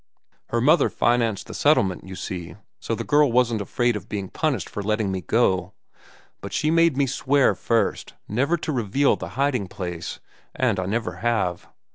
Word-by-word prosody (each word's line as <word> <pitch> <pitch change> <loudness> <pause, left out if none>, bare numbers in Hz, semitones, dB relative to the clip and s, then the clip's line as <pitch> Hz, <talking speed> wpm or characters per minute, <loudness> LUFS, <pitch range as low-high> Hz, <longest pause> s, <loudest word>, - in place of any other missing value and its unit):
Her - - -1
mother - - +4
financed 120 -4 +1
the - - -9
settlement, 95 -2 +2
you 95 - -7
see, 90 -2 -6 0.2
so 115 - -2
the - - -4
girl 145 -3 +3
wasn't 120 -3 +2
afraid 120 +3 0
of 105 - -7
being 100 -3 -4
punished 135 - -1
for 105 - -5
letting 105 -1 0
me 95 -1 -3
go. 95 -1 +1 0.7
But - - -7
she 155 - +1
made 165 -3 +3
me 140 - +3
swear, 135 +1 +2
first, 115 -1 -1
never 140 +10 +1
to 155 - -4
reveal 130 +2 +2
the - - -7
hiding 135 -7 +1
place; 90 -3 -6 0.4
and - - +1
I 90 - -2
never 100 -4 -2
have. 95 -5 -1
115 Hz, 175 wpm, -24 LUFS, 95-130 Hz, 0.7 s, mother